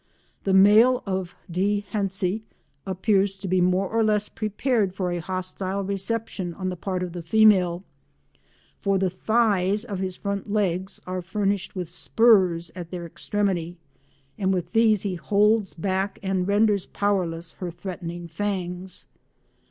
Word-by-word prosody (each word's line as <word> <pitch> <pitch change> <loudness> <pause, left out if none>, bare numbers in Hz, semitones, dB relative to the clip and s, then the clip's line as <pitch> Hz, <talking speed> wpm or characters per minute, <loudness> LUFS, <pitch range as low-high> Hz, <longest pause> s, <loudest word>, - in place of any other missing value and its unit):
The 195 - +2
male 215 +6 +6
of 190 -3 -3
D. 200 +4 0
hentzi 195 0 -1 0.5
appears 195 +1 +1
to 190 0 -6
be 185 0 +2
more 185 +2 +2
or 225 +3 +1
less 210 -1 +1
prepared 215 -2 -1
for 185 -2 -1
a 175 - -2
hostile 185 +2 -3
reception 195 -2 -3
on 185 -1 -3
the 180 - -3
part 185 +1 -3
of 180 -2 -5
the 175 - -5
female, 185 -2 +4 1.0
for 195 -2 +1
the 190 -1 +1
thighs 210 0 +1
of 200 -6 -4
his 185 -1 -2
front 200 +1 -4
legs 190 -2 -1
are 185 0 -3
furnished 195 +1 -2
with 180 -2 -3
spurs 180 -3 +3
at 175 -2 -7
their 175 -1 -5
extremity 175 -1 -2 0.6
and 190 -1 +1
with 180 -3 -2
these 220 -3 +4
he 200 -2 -1
holds 205 +3 +2
back 190 +3 -1
and 190 -1 0
renders 205 -1 +2
powerless 175 -5 -1
her 180 - -3
threatening 175 -1 -6
fangs. 180 0 -4
190 Hz, 145 wpm, -25 LUFS, 180-205 Hz, 1.0 s, male